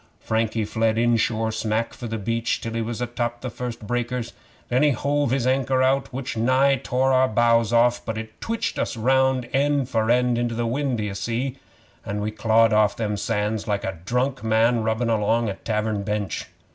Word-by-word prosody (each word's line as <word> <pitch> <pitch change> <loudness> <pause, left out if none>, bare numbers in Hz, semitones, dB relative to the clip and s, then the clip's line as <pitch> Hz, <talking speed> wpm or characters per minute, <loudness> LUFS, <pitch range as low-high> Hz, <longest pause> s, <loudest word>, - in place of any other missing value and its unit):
Frankie 110 -1 -1
fled 110 +1 0
inshore 115 -1 +1
smack 110 +1 -1
for 120 -1 -7
the 115 0 -3
beach, 115 +2 -1
till 115 - -5
he 115 - -1
was 115 +1 -4
atop 120 -1 -2
of 120 - -28
the 125 - -4
first 120 -2 -6
breakers. 120 +1 -2 0.3
Then 125 +2 +1
he 150 - +5
hove 145 +2 0
his 130 0 0
anchor 130 0 +2
out, 135 +1 +1
which 130 -1 -4
nigh 130 +4 +3
tore 130 +2 +1
our 130 0 +4
bows 115 0 +3
off, 120 +1 +3
but 110 -1 -4
it 110 0 -8
twitched 230 0 -2
us - - -2
round 130 +1 +2
end 140 -1 +1
for 110 -2 0
end 125 0 +3
into 120 -1 -1
the 120 0 -1
wind, 130 +1 -1
d'ye 105 -2 -3
see, 120 +6 -3 0.4
an' 100 +1 -4
we 105 +1 -2
clawed 115 +1 +3
off 105 -1 +3
them 105 -2 -1
sands 105 0 -2
like 100 -1 -1
a 95 -3 -4
drunk 125 +3 -1
man 115 +1 +3
rubbin' 110 +2 0
along 115 +1 +1
a - - -2
tavern 105 0 -2
bench. 105 0 -3
115 Hz, 195 wpm, -23 LUFS, 110-125 Hz, 0.4 s, he